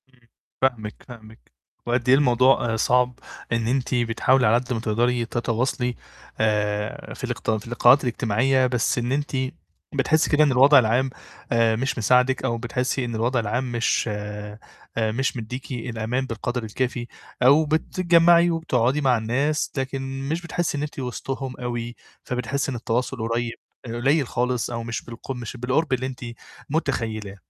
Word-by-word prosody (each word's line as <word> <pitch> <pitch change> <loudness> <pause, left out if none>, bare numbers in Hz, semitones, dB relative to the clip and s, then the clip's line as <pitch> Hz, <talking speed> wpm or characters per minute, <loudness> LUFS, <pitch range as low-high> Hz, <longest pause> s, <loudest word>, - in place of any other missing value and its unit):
إمم، 130 -1 -27 0.4
فاهمِك، 115 -5 -1
فاهمِك. 110 -3 -14 0.3
وقد 120 +1 0
أي 130 - +8
الموضوع 130 -3 +3
آآ - - 0
صَعب، 125 +1 +2 0.3
إن 115 -1 0
أنتِ 130 +1 0
بتحاولي 120 +2 +2
على 110 - +5
قد 125 +1 -1
ما 115 - -1
تقدري 120 +2 +1
تتواصلي 120 +1 -1 0.4
آآ 105 -1 -1
في - - -11
الاقت - - -3
في 110 -1 -2
اللقاءات 120 +3 +5
الإجتماعية، 125 +2 +2
بس 125 -1 0
إن 120 +1 -1
أنتِ 145 +2 -1 0.6
بتحسّي 155 +3 +2
كده 155 0 +5
إن 145 - +3
الوضع 135 +3 +7
العام 125 +3 +2 0.4
آآ 115 -1 +3
مش 130 +4 -2
مساعدِك 125 +3 +3
أو 115 - 0
بتحسّي 125 +2 -2
إن 120 -1 -4
الوضع 120 +3 +1
العام 125 +3 -2
مش 120 0 +1
آآ 105 0 -5 0.4
مش 115 +4 0
مدّيكِ 125 +4 -6
الأمان 120 +1 -2
بالقدر 120 +1 -3
الكافي، 120 +2 -3 0.4
أو 145 +5 +6
بتتجمَّعي 170 +2 +4
وبتقعُدي 145 -4 +1
مع 130 -3 +3
الناس 135 +7 0
لكن 135 0 -3
مش 165 +3 -1
بتحسّي 175 -3 -2
إن 145 - -2
أنتِ 150 -1 -6
وِسطهم 130 +1 -4
أوي، 120 -1 -4 0.3
فبتحسّي 130 +2 -2
إن - - -4
التواصل 120 +3 -2
قريب 120 0 -1 0.3
آآ - - -7
قُلَيل 135 +3 +2
خالص 125 -1 -1
أو 115 -1 -4
مش 115 0 -4
بالق 120 +3 -8
مش 125 -1 -6
بالقُرب 130 +5 0
اللي 130 0 0
أنتِ 130 -1 -6 0.5
مُتخيّلاه. 115 -9 -2
125 Hz, 155 wpm, -24 LUFS, 115-135 Hz, 0.6 s, أي